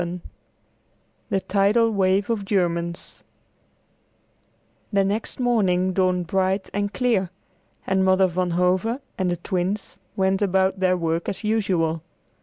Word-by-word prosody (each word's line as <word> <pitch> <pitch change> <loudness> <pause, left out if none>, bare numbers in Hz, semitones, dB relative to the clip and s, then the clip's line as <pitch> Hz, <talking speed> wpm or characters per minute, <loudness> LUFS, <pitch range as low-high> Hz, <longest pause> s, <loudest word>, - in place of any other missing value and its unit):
VII 175 +1 -4 1.1
THE 195 - 0
TIDAL 205 +5 +2
WAVE 195 +1 +1
OF 215 -3 -1
GERMANS 170 -3 -2 1.7
The 200 -2 +3
next 205 +6 -3
morning 190 -7 +2
dawned 185 -1 +1
bright 190 +2 0
and 205 0 -1
clear, 225 -8 +1 0.6
and 190 0 +1
Mother 190 0 +4
Van 180 0 -1
Hove 185 +7 +1 0.2
and 185 -1 +1
the 175 - -1
Twins 185 +4 -3 0.2
went 190 0 +1
about 190 -1 +1
their 185 -1 +2
work 165 0 -1
as 195 - -6
usual. 185 -7 0
190 Hz, 125 wpm, -23 LUFS, 180-200 Hz, 1.7 s, Mother